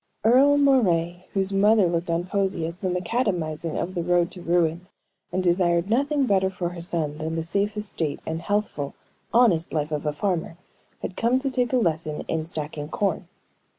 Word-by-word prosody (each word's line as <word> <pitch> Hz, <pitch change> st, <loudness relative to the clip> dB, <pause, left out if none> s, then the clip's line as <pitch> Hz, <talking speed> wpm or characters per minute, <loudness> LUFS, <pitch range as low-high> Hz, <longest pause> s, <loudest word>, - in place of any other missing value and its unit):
Earle 265 Hz, +6 st, +5 dB
Moray, 180 Hz, -11 st, +2 dB
whose 195 Hz, 0 st, 0 dB
mother 205 Hz, +1 st, +5 dB
looked 170 Hz, 0 st, -1 dB
on 170 Hz, +1 st, +1 dB
poesy 190 Hz, -3 st, -1 dB
as 165 Hz, -, -4 dB
the 185 Hz, 0 st, -2 dB
macadamizing 180 Hz, -5 st, -1 dB
of 185 Hz, -, -3 dB
the 175 Hz, -, -1 dB
road 175 Hz, 0 st, +2 dB
to 180 Hz, -, -8 dB
ruin, 170 Hz, 0 st, +1 dB, 0.4 s
and 185 Hz, +1 st, -1 dB
desired 175 Hz, +1 st, +2 dB
nothing 280 Hz, +3 st, +2 dB
better 190 Hz, -4 st, +2 dB
for 180 Hz, -2 st, -3 dB
her 175 Hz, -1 st, -8 dB
son 160 Hz, -3 st, -2 dB
than 160 Hz, +1 st, -3 dB
the 165 Hz, -, -1 dB
safe 200 Hz, +5 st, -1 dB
estate 165 Hz, -8 st, -3 dB
and 160 Hz, +1 st, -3 dB
healthful, 205 Hz, -9 st, -2 dB, 0.4 s
honest 215 Hz, -9 st, +3 dB
life 155 Hz, -1 st, -1 dB
of 150 Hz, 0 st, -2 dB
a -, -, +2 dB
farmer, 165 Hz, +1 st, -2 dB, 0.5 s
had 180 Hz, -, -4 dB
come 235 Hz, +3 st, +2 dB
to 270 Hz, +1 st, -1 dB
take 250 Hz, -2 st, 0 dB
a 255 Hz, -, +3 dB
lesson 160 Hz, -7 st, -1 dB
in 160 Hz, -1 st, -2 dB
stacking 150 Hz, -2 st, -5 dB
corn. 190 Hz, -1 st, -1 dB
175 Hz, 185 wpm, -25 LUFS, 165-205 Hz, 0.5 s, Earle